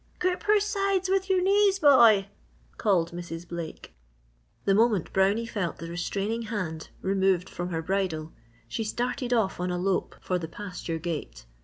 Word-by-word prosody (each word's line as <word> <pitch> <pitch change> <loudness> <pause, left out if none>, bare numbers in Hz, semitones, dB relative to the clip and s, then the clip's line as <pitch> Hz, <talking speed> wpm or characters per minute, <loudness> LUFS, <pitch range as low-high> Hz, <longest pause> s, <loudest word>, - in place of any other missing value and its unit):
"Grip 365 0 0
her 420 0 +5
sides 395 -2 0
with 385 0 +1
your 370 -1 +3
knees, 395 0 +4
boy!" 235 - +6 0.5
called 180 -5 +2
Mrs. 170 0 -7
Blake. 170 -2 -7 0.7
The 195 - +4
moment 215 -4 +2
Brownie 200 +4 +2
felt 200 -7 -3
the 165 +1 -7
restraining 200 +6 -2
hand 185 -8 -4
removed 190 -1 +2
from 175 +1 -5
her 165 -2 -3
bridle 165 -4 -2 0.3
she 225 - -3
started 245 +3 -2
off 220 -7 +1
on 180 +1 -1
a 180 - -1
lope 185 +1 -1
for 180 -1 -1
the 165 - -5
pasture 180 -2 -5
gate. 150 - -5
195 Hz, 160 wpm, -27 LUFS, 175-245 Hz, 0.7 s, boy